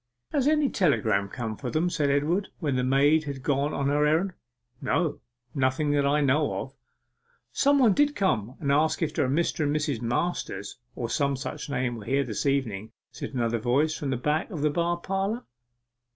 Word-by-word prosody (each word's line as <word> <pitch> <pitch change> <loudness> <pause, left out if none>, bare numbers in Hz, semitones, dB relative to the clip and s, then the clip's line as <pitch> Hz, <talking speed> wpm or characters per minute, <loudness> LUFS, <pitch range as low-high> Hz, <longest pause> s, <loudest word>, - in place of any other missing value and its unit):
'Has 280 -2 +1
any 300 -1 +3
telegram 110 - +1
come 115 -1 -4
for 125 +3 -5
them?' 155 +7 +1
said 150 -4 +1
Edward, 155 +8 +1
when 145 -6 -1
the 125 - +1
maid 145 +4 +3
had 140 -2 -6
gone 140 +1 +1
on 140 -2 -1
her 145 +1 +2
errand. 170 +5 +1 0.5
'No 165 -3 0 0.3
nothing 135 +2 +1
that 145 -1 +2
I 150 +1 +2
know 145 +2 +2
of.' - - -7 0.8
'Somebody 275 -6 +4
did 295 - -11
come 125 - 0
and 140 -2 0
ask 155 +4 +2
if 155 -1 -2
a 130 - +2
Mr. 160 +2 +1
and 145 +1 0
Mrs. 145 -6 -1
Masters, 120 - -2 0.2
or 120 - -3
some 140 +3 0
such 135 +3 -6
name, 125 -3 -1
were 105 - -9
here 140 +4 +1
this 120 +2 -3
evening,' 115 -6 -1 0.2
said - - -7
another 115 -1 0
voice 140 +7 +1
from 145 - -4
the 130 - 0
back 150 +5 0
of 165 -8 -5
the 150 0 +2
bar 170 +2 0
parlour. 195 +6 -2
145 Hz, 190 wpm, -27 LUFS, 130-160 Hz, 0.8 s, Somebody